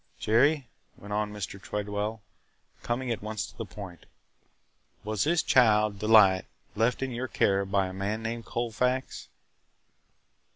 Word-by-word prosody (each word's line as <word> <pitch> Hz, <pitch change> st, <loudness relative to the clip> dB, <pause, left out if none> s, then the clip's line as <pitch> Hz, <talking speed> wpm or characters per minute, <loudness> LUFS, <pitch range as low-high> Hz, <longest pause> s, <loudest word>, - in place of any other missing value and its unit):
"Jerry," 135 Hz, +5 st, +2 dB, 0.3 s
went 105 Hz, +1 st, -8 dB
on 105 Hz, 0 st, -1 dB
Mr. 100 Hz, -1 st, -6 dB
Tredwell, 105 Hz, +1 st, -3 dB, 0.6 s
coming 120 Hz, +1 st, -2 dB
at 115 Hz, -, -2 dB
once 110 Hz, 0 st, -3 dB
to -, -, -14 dB
the -, -, -5 dB
point, 90 Hz, -5 st, -10 dB, 1.0 s
"was 105 Hz, +1 st, -1 dB
this 165 Hz, +1 st, +2 dB
child, 105 Hz, -4 st, +4 dB
Delight, 105 Hz, -4 st, +5 dB, 0.3 s
left 115 Hz, +5 st, +1 dB
in 135 Hz, -, -3 dB
your 125 Hz, +2 st, -3 dB
care 100 Hz, -4 st, +1 dB
by 95 Hz, 0 st, +1 dB
a 95 Hz, -, -6 dB
man 100 Hz, +4 st, -3 dB
named 115 Hz, 0 st, -4 dB
Colfax?" 125 Hz, +3 st, -2 dB
110 Hz, 135 wpm, -28 LUFS, 100-120 Hz, 1.0 s, Delight